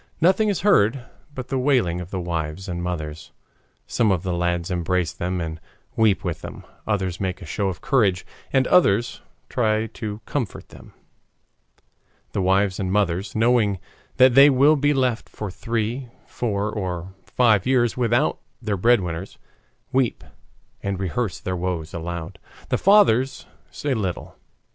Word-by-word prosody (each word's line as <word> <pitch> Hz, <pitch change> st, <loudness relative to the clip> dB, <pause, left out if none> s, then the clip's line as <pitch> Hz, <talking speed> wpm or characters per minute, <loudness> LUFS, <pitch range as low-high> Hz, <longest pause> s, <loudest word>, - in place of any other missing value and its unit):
Nothing 190 Hz, +6 st, +3 dB
is 200 Hz, -, -1 dB
heard 125 Hz, -, +3 dB, 0.3 s
but 130 Hz, -1 st, -6 dB
the 135 Hz, -, 0 dB
wailing 120 Hz, -11 st, +1 dB
of 90 Hz, -, -8 dB
the 95 Hz, -, -3 dB
wives 85 Hz, 0 st, -4 dB
and 85 Hz, -1 st, -4 dB
mothers. 80 Hz, -3 st, -5 dB, 0.5 s
Some 110 Hz, -4 st, +1 dB
of 90 Hz, -2 st, 0 dB
the 90 Hz, -2 st, -2 dB
lads 85 Hz, 0 st, -1 dB
embrace 90 Hz, -1 st, 0 dB
them 90 Hz, +1 st, -3 dB
and 80 Hz, -1 st, -5 dB, 0.3 s
weep 110 Hz, -3 st, +3 dB
with 85 Hz, -5 st, -3 dB
them, -, -, -9 dB, 0.2 s
others 95 Hz, -5 st, -1 dB
make 95 Hz, -1 st, -2 dB
a 95 Hz, -, -10 dB
show 100 Hz, +6 st, -2 dB
of 90 Hz, -1 st, -4 dB
courage, 100 Hz, -10 st, +2 dB, 0.3 s
and 130 Hz, -1 st, +3 dB
others 120 Hz, -, +3 dB, 0.3 s
try 110 Hz, -2 st, +1 dB
to 110 Hz, -1 st, -6 dB
comfort 125 Hz, -9 st, -4 dB
them. -, -, -15 dB, 1.4 s
The 100 Hz, -, -1 dB
wives 95 Hz, +1 st, +2 dB
and 95 Hz, -2 st, -1 dB
mothers, 95 Hz, -1 st, 0 dB
knowing 110 Hz, -3 st, +3 dB, 0.4 s
that 130 Hz, -1 st, +6 dB
they 140 Hz, +3 st, +8 dB
will 140 Hz, +3 st, +5 dB
be 145 Hz, 0 st, +2 dB
left 125 Hz, -4 st, 0 dB
for 105 Hz, -3 st, -6 dB
three, 115 Hz, +5 st, -3 dB, 0.2 s
four, 105 Hz, -3 st, -2 dB
or 95 Hz, -3 st, -4 dB
five 110 Hz, -5 st, +2 dB
years 120 Hz, -3 st, +2 dB
without 120 Hz, +3 st, +1 dB, 0.2 s
their 105 Hz, -4 st, -2 dB
breadwinners, 95 Hz, -4 st, +1 dB, 0.6 s
weep 130 Hz, -2 st, +1 dB, 0.6 s
and 100 Hz, -1 st, -3 dB
rehearse 95 Hz, +1 st, -2 dB
their 90 Hz, 0 st, -3 dB
woes 90 Hz, -2 st, -3 dB
aloud. 85 Hz, +2 st, -5 dB, 0.3 s
The -, -, +1 dB
fathers 160 Hz, -, +4 dB, 0.2 s
say 145 Hz, -2 st, -2 dB
little. 95 Hz, -7 st, -3 dB
100 Hz, 150 wpm, -23 LUFS, 90-125 Hz, 1.4 s, they